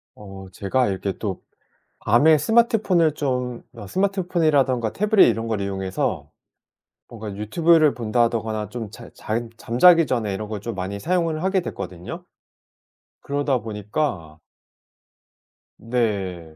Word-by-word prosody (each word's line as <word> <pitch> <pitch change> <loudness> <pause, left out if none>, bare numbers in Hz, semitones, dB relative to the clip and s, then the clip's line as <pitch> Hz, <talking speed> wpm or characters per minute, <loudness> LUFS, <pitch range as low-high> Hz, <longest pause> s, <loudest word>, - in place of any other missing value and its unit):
어, 95 -2 -11
제가 110 +8 0
이렇게 95 0 -2
또 100 -4 -4 0.6
밤에 150 +8 +4
스마트폰을 220 - +3
좀 125 -4 -3
어 100 - -10
스마트폰이라든가 160 - +1
태블릿 210 0 +4
이런 115 0 -2
걸 110 -3 -2
이용해서 95 -1 -3 0.8
뭔가 110 -3 -8
유튜브를 155 - +3
본다거나 110 -2 -1
좀 110 -2 -6
잘 115 +2 -12
잘 115 +2 -3
잠자기 165 +9 +5
전에 110 -7 -1
이런 105 +2 -5
걸 105 -2 -5
좀 115 +2 -5
많이 95 +1 -4
사용을 165 - 0
하게 190 0 +1
됐거든요. 95 - -7 1.0
그러다 140 -2 -1
보니까 105 - -4 1.4
네. 100 -9 -2
115 Hz, 270 characters per minute, -22 LUFS, 100-155 Hz, 1.4 s, 잠자기